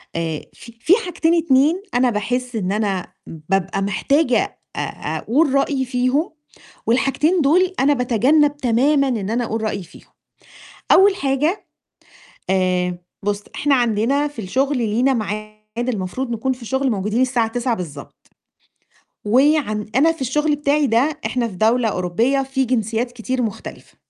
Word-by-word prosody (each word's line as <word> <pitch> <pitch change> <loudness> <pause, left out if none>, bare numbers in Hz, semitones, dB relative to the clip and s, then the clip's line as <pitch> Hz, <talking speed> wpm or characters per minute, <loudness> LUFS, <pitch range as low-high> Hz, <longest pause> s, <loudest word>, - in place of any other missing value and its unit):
آآ 165 -2 -2
في 235 - -13
في 320 +9 +4
حاجتين 335 -2 0
2 315 +2 +3
أنا 250 0 +3
باحِسّ 245 +3 -2
إن 195 -4 -1
أنا 200 -3 -1 0.2
بابقى 190 +5 -2
محتاجة 245 - +1 0.2
أ - - -4 0.4
أقول 280 +4 +1
رأيي 275 -1 +1
فيهم، 255 +5 0 0.6
والحاجتين 275 +8 +2
دول 355 +6 +3
أنا 280 +2 +4
باتجنب 280 +4 +2
تمامًا 275 +3 +2
إن 220 -6 -2
أنا 240 +2 0
أقول 225 -1 -3
رأيي 210 -3 -2
فيهم، - - -17 0.8
أول 390 +1 +6
حاجة 285 +6 -1 0.8
آآ 180 -1 +1 0.3
بُص 205 0 -1
إحنا 290 -1 +2
عندنا 245 +4 +1
في 290 - -19
الشُّغل 270 +8 0
لينا 240 +4 +1
معاد 215 +1 -5
المفروض 235 +3 -3
نكون 235 +3 -1
في 250 -1 -9
الشُّغل 265 +3 -1
موجودين 210 +2 -1
الساعة 250 -3 +1
09:00 240 +1 -1
بالضبط، 150 -7 -9 1.0
وعن 245 -3 +2
أنا 320 +5 +4
في 325 - -15
الشُّغل 295 +4 +1
بتاعي 295 0 +1
ده 265 +6 +1
إحنا 240 -2 -1
في 185 - -10
دولة 225 +3 +2
أوروبية 215 +9 0
في 270 0 -1
جنسيات 235 0 -1
كتير 250 +2 -3
مختلفة. 220 -4 -7
245 Hz, 140 wpm, -20 LUFS, 215-275 Hz, 1.0 s, أول